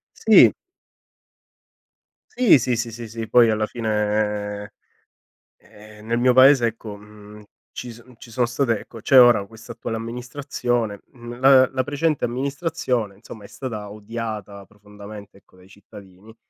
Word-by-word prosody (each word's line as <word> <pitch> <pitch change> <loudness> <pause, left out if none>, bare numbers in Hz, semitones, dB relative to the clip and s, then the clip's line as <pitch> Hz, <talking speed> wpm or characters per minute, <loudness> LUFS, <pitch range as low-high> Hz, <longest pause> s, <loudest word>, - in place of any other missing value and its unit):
Sì. - - +6 1.8
Si, 245 - +5
sì, 125 0 -1
sì 115 +1 -4
sì 115 +1 -8
sì, 115 0 -7
poi 120 0 +5
alla 110 0 -1
fine, 105 -2 -2 0.9
ehm, 105 0 -17
nel 115 +1 -1
mio 125 +1 +3
paese 130 -1 +6
ecco, 110 -2 -7
mhmm, 105 0 -15 0.3
ci 125 - -8
son 120 +2 -16
ci 120 - -14
sono 120 +1 0
state 120 -2 -1
ecco 115 - -13
c'è 135 +3 +5
ora 120 -5 +5
questa 115 +1 -13
attuale 115 -1 -6
amministrazione, 120 -2 -4
mhmm, 120 -1 -11
la 130 0 +6
la 130 -1 -2
precedente 145 +2 -1
amministrazione 130 - -3
insomma 105 +1 -13
è - - -11
stata 110 -6 -7
odiata 105 -2 -7
profondamente 105 0 -13
ecco 100 - -26
dai 90 0 -19
cittadini, 100 +1 -16
115 Hz, 140 wpm, -22 LUFS, 105-125 Hz, 1.8 s, Sì